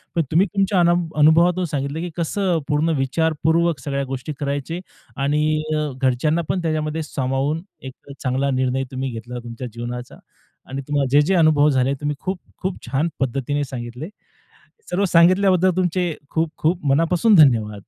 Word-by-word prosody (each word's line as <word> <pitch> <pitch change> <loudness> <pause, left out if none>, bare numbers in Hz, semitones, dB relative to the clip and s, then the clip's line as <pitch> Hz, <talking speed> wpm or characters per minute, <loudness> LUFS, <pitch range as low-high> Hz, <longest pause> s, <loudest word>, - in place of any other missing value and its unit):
पण 170 - +3
तुम्ही 180 +6 +4
तुमच्या 195 -1 +2
अना 170 0 +4 0.3
अनुभवातून 170 +4 +4
सांगितलं, 145 0 -3
की 175 +1 -4
कसं 175 0 0
पूर्ण 150 +2 +1
विचारपूर्वक 160 +3 +1
सगळ्या 140 0 -2
गोष्टी 135 +2 -5
करायचे 145 +4 -3 0.4
आणि 150 +2 +1 0.2
अ, 150 -1 -1
घरच्यांना 135 +6 +1
पण 185 - 0
त्याच्यामध्ये 155 -1 -2
सामावून 135 +3 -2 0.2
एक 135 +1 -11
चांगला 135 +1 0
निर्णय 130 0 0
तुम्ही 130 0 -3
घेतला 120 +2 -7
तुमच्या 120 +1 -7
जीवनाचा 120 +1 -6 0.5
आणि 135 +1 -4
तुम्हाला 145 -2 +1
जे, 145 +2 +6
जे 160 +6 +1
अनुभव 155 -3 +4
झाले, 130 -1 +2
तुम्ही 145 0 -1
खूप-खूप 185 +1 -5
छान 135 +6 0
पद्धतीने 135 +2 -1
सांगितले. 125 +5 -7 0.8
सर्व 195 +3 +1
सांगितल्याबद्दल 185 +2 +4
तुमचे 180 -1 0 0.2
खूप-खूप 160 +1 -1
मनापासून 165 +9 +3
धन्यवाद. 110 - +4
150 Hz, 145 wpm, -21 LUFS, 135-170 Hz, 0.8 s, जे